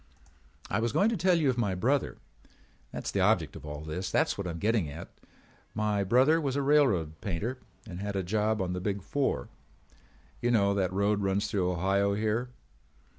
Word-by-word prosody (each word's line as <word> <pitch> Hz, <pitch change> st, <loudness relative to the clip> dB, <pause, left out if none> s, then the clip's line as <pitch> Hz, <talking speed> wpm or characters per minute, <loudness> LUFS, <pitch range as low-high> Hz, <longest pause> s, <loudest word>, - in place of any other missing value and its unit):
"I 100 Hz, -, -1 dB
was 115 Hz, +1 st, -1 dB
going 195 Hz, +9 st, +3 dB
to 230 Hz, -, 0 dB
tell 180 Hz, -1 st, +3 dB
you 150 Hz, -5 st, +3 dB
of 125 Hz, -, -4 dB
my 100 Hz, -5 st, 0 dB
brother. 130 Hz, +10 st, 0 dB, 0.7 s
That's -, -, -4 dB
the -, -, -1 dB
object -, -, +2 dB
of 75 Hz, -, -9 dB
all 75 Hz, 0 st, -6 dB
this. 80 Hz, +4 st, -4 dB
That's -, -, +1 dB
what 100 Hz, -2 st, -4 dB
I'm 85 Hz, -1 st, -4 dB
getting 105 Hz, -3 st, +1 dB
at. 80 Hz, +4 st, -8 dB, 0.7 s
My 105 Hz, -1 st, 0 dB
brother 130 Hz, -, +4 dB
was 135 Hz, -3 st, -1 dB
a 140 Hz, -, 0 dB
railroad 105 Hz, -, +2 dB
painter 105 Hz, +8 st, -3 dB, 0.3 s
and 90 Hz, -3 st, -7 dB
had 100 Hz, 0 st, -4 dB
a 95 Hz, -, 0 dB
job 105 Hz, +2 st, 0 dB
on 90 Hz, -1 st, -3 dB
the 90 Hz, -, -3 dB
Big 100 Hz, 0 st, -2 dB
Four. 140 Hz, +5 st, -1 dB, 0.9 s
You 120 Hz, -, +1 dB
know 100 Hz, -4 st, +3 dB
that 95 Hz, -2 st, 0 dB
road 100 Hz, +2 st, +1 dB
runs 100 Hz, +1 st, 0 dB
through 95 Hz, -4 st, +1 dB
Ohio 100 Hz, +3 st, +1 dB
here. 110 Hz, +4 st, -1 dB
100 Hz, 190 wpm, -29 LUFS, 95-120 Hz, 0.9 s, brother